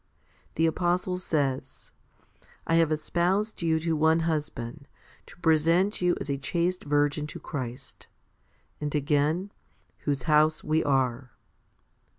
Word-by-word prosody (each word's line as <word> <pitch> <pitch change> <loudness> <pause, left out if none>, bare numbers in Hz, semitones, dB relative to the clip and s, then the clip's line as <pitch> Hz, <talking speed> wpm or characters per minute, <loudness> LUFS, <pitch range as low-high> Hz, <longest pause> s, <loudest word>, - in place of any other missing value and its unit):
The 165 - +2
apostle 180 +2 0
says, 140 -6 -2 0.4
/ - - -30
have 165 -1 +3
espoused 180 +8 0
you 165 -1 +2
to 165 0 0
one 160 +2 +3
husband, 150 -4 -3 0.4
to - - -15
present 165 +6 +3
you 180 0 +3
as. - - -5
a 140 -1 -2
chaste 175 +5 -1
virgin 145 +1 +1
to - - -8
Christ 125 -5 -7 0.7
2; 150 - -4
and 150 - -2
again, 150 +6 +1 0.5
Whose 140 -2 -2
house 155 0 +3
we 155 +1 +1
are. 130 -3 0
155 Hz, 130 wpm, -27 LUFS, 145-170 Hz, 0.7 s, have